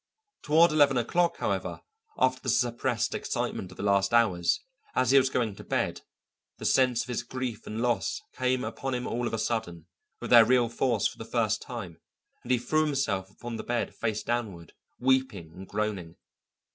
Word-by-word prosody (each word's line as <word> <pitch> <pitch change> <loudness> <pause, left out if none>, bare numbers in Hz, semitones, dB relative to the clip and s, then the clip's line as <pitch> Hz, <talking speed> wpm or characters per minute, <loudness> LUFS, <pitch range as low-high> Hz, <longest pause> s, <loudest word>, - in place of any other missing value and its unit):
Toward 160 +3 +5
eleven 145 -3 +4
o'clock, 170 +8 +1
however, - - -2 0.4
after 130 0 +2
the 130 - -3
suppressed 120 0 0
excitement 95 - -3
of 90 - -14
the - - -5
last 100 +2 +2
hours, 95 -7 +3 0.4
as 130 -1 +3
he 140 - +7
was 130 0 +1
going 115 -6 -1
to - - -9
bed, - - -1 0.6
the - - -7
sense 125 -3 +3
of - - -12
his 125 - -2
grief 130 -4 -5
and 110 +2 -3
loss 120 -5 0 0.2
came 130 0 0
upon 135 -1 -3
him 125 - -3
all 120 +1 -2
of - - -5
a - - -2
sudden, 95 -8 -3 0.3
with - - -6
their 120 -2 +10
real 120 0 +3
force 120 -3 +1
for - - -11
the - - -5
first 110 -2 0
time, 95 -10 -8 0.4
and 125 - -5
he 125 - +5
threw 155 +6 +1
himself 110 -10 -1
upon 115 +3 -7
the - - -5
bed 120 0 -2
face 110 -2 -2
downward, 105 -9 -3 0.3
weeping 125 -11 0
and 95 +2 -10
groaning. 100 -6 -3
120 Hz, 185 wpm, -28 LUFS, 105-130 Hz, 0.6 s, their